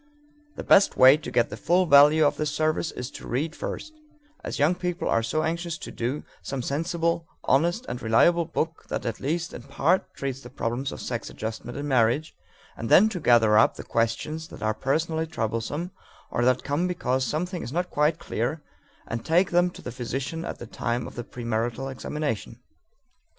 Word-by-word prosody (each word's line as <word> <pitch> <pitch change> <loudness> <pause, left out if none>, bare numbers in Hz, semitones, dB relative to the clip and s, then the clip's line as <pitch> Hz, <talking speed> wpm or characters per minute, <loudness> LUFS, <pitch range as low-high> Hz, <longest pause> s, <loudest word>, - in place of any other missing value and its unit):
The - - -6
best 200 - +5
way 130 +2 +9
to 155 - -7
get 120 -1 +1
the - - -4
full 180 +2 +2
value 150 +1 +7
of 145 - +2
this 155 -1 0
service 155 +2 0
is 125 +2 -6
to - - -10
read 150 +6 -2
first, 310 - -5 0.5
as - - -4
young 150 +5 +4
people 180 0 -3
are 115 - +2
so 155 +8 -1
anxious 170 +1 -2
to - - -8
do, 125 +5 -3 0.2
some 135 -3 -4
sensible, 165 +3 -1 0.2
honest, 170 - +2
and 125 - -5
reliable 170 +10 +4
book 160 0 -3
that - - -3
at 115 -2 -3
least 165 +4 -2
in - - -7
part 140 +7 0
treats 135 -1 -4
the 125 - -11
problems 125 +2 -3
of - - -7
sex 120 -2 -4
adjustment 110 +3 -6
in 145 +1 -4
marriage, 130 +3 +2 0.4
and 115 - -5
then 215 +4 +7
to 185 - -4
gather 115 -6 +5
up - - +4
the - - -8
questions 115 +8 -1
that - - -10
are 110 0 +1
personally 160 +7 -1
troublesome 115 - -3 0.4
or 120 - 0
that 130 0 +2
come 150 +5 0
because 130 -7 0
something 175 +7 -2
is 120 - -6
not 175 +4 -2
quite 150 +2 +2
clear 135 +6 -3 0.4
and 115 0 -4
take 175 +6 +3
them 175 +1 +4
to - - -13
the 125 - -5
physician 130 +6 -4
at - - -5
the - - -8
time 120 +2 -2
of - - -8
the 120 - -5
premarital 120 +3 -3
examination. 145 -3 -4
145 Hz, 190 wpm, -26 LUFS, 120-165 Hz, 0.5 s, way